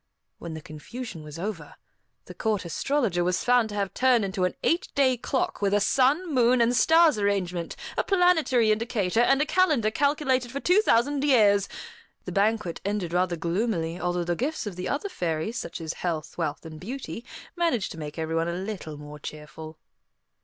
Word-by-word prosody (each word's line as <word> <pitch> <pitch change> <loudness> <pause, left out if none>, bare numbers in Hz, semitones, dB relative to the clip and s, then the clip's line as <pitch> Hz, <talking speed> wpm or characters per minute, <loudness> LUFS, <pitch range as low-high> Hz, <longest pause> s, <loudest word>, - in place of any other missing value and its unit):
When 165 -2 -6
the 160 - -7
confusion 165 +6 -8
was 150 +1 -9
over, 170 -5 -5 0.5
the - - -10
Court 215 -5 -1
Astrologer 190 - 0
was 180 0 0
found 245 -2 +3
to 205 - -6
have 200 -2 -2
turned 250 -4 +3
into 190 -1 -1
an 180 - -2
eight 335 - +1
day 265 -2 +4
clock, 250 0 -2
with 200 0 +2
a - - +4
sun, 275 - +2
moon, 250 -1 +4
and 235 +1 +3
stars 320 +1 +5
arrangement, 180 -4 -1 0.2
a - - +1
planetary 320 - +3
indicator, 215 -2 0
and 270 +3 +4
a - - -3
calendar 300 - +2
calculated 270 -2 +1
for 275 - -3
two 360 +8 +4
thousand 280 - +2
years. 210 -8 +4 0.6
The - - -5
banquet 205 -3 0
ended 195 -4 -2
rather 180 0 +1
gloomily, 170 0 -1
although 175 0 -1
the 175 0 -1
gifts 280 - -2
of 205 -4 -5
the 180 +1 -4
other 290 +8 -2
fairies, 175 - -2
such - - -6
as 160 -1 -4
health, 165 -4 -4
wealth, 160 -2 -3
and 155 -1 -9
beauty, 235 - -6 0.3
managed 330 - 0
to 165 - -8
make 150 0 -7
everyone 165 +1 -1
a 170 - -2
little 185 -5 -5
more 150 0 -10
cheerful. 155 +1 -9
205 Hz, 180 wpm, -26 LUFS, 170-255 Hz, 0.6 s, stars